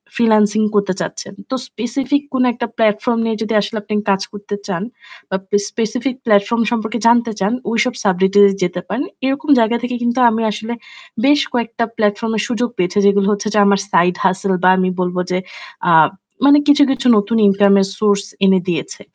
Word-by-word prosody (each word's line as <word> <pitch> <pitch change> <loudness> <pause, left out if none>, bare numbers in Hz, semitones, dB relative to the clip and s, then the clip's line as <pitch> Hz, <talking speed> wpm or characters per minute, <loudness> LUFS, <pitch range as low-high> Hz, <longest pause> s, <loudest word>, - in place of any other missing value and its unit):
Freelancing 215 -2 +2
করতে 200 -2 +1
চাচ্ছেন। 180 +3 -6 0.2
তো 265 - -2
specific 260 +5 -2
কোন 260 -1 +1
একটা 235 +1 -4
platform 220 +1 +1
নিয়ে 225 -1 -1
যদি 225 +1 -2
আসলে 205 +2 -5
আপনি 210 - -6 0.2
কাজ 195 -1 +1
করতে 205 0 -6
চান 195 -2 -3 0.5
বা 190 - -2
পেস 205 0 +1
specific 235 +3 -3
platform 215 +2 +2
সম্পর্কে 225 0 -2
জানতে 235 0 +3
চান, 195 +2 0 0.2
ঐসব 230 +2 0
subject 190 0 +1
এ - - +8 0.2
যেতে 180 0 -2
পারেন। 210 +9 -2 0.2
এরকম 275 +4 -2
জায়গা 225 +1 +2
থেকে 245 0 -3
কিন্তু 240 +2 0
আমি 225 0 -2
আসলে 220 +3 -5 0.5
বেশ 290 +1 +4
কয়েকটা 235 -1 -2
platform 215 +1 0
এর 210 - -1
সুযোগ 245 -1 -1
পেয়েছি। 180 +2 -1
যেগুলো 200 0 +3
হচ্ছে 205 +1 -4
যে 210 - +2
আমার 200 -1 +3
side 175 +1 +2
hustle 190 0 0
বা 185 - +6
আমি 185 0 +1
বলবো 180 0 -1
যে 180 - +1 0.5
আ - - +4 0.5
মানে 285 +1 +6
কিছু, 290 0 +5
কিছু 270 -1 -1
নতুন 205 +3 0
ইনকামের 200 0 +3
source 200 -1 +1 0.2
এনে 190 -1 +4
দিয়েছে। 175 -3 -4
215 Hz, 180 wpm, -17 LUFS, 200-235 Hz, 0.5 s, এ